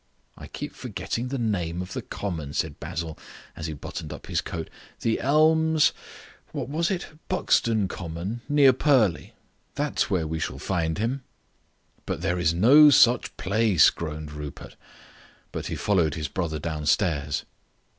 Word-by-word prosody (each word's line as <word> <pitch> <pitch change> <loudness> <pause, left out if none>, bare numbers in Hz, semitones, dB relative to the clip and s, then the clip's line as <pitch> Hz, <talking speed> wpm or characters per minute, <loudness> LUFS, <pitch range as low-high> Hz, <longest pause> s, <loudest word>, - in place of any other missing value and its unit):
"I - - -10
keep - - -7
forgetting 120 +2 -4
the 135 +2 -3
name 90 -8 -1
of 90 0 -5
the - - -3
common," 80 -8 -5
said 75 -1 -2
Basil, 80 -1 -5 0.4
as 80 - -5
he 80 - -4
buttoned 70 - -7
up - - -8
his - - -1
coat. 80 -2 -5 0.3
"The 115 - +1
Elms 155 +2 +4 0.6
what - - -4
is 170 - +2
it? 175 -5 -4
Buxton 115 - +2
Common, 90 +6 -5
near 145 -3 +6
Purley. 125 - +2 0.4
That's - - 0
where 85 -4 +1
we 80 +1 -3
shall 65 - -3
find 80 +1 -1
him." 120 +6 -1 0.9
"But - - -3
there 90 +2 0
is 80 -2 +3
no 130 - +7
such 125 -3 +4
place," 100 -2 +4
groaned 75 -2 -6
Rupert; 75 -1 -8 0.8
but - - -4
he - - -3
followed 85 -7 +1
his 75 -3 -3
brother 85 -4 -2
downstairs. 75 -1 0
90 Hz, 150 wpm, -26 LUFS, 80-125 Hz, 0.9 s, no